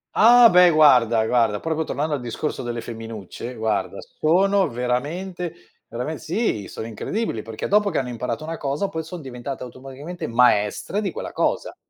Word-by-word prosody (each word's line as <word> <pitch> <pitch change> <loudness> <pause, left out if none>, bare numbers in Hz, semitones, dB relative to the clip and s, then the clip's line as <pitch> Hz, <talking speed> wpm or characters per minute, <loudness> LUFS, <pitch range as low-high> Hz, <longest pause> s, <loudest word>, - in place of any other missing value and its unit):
Ah, 240 +2 +8
beh, 180 -4 +6
guarda, 125 -8 +5
guarda 110 -3 +2
proprio 160 -1 -1
tornando 150 +1 -2
al 145 - -1
discorso 125 +4 -4
delle 120 -1 -4
femminucce, 115 +1 -8
guarda 110 -1 -2
sono 195 +5 +1
veramente, 155 +9 -3 0.4
verame 135 +6 -5
sì, 170 - -2
sono - - -7
incredibili 115 - -3
perché 110 0 -6
dopo 210 0 +3
che 170 - -2
hanno 125 - -1
imparato 120 +3 -4
una 165 +1 -5
cosa, 145 +8 -2
poi 160 -4 -4
son 170 +2 -8
diventate 130 0 -6
automaticamente 135 +7 -8
maestre 115 - +2
di 210 - -1
quella - - -6
cosa. - - -1
140 Hz, 160 wpm, -22 LUFS, 120-175 Hz, 0.4 s, Ah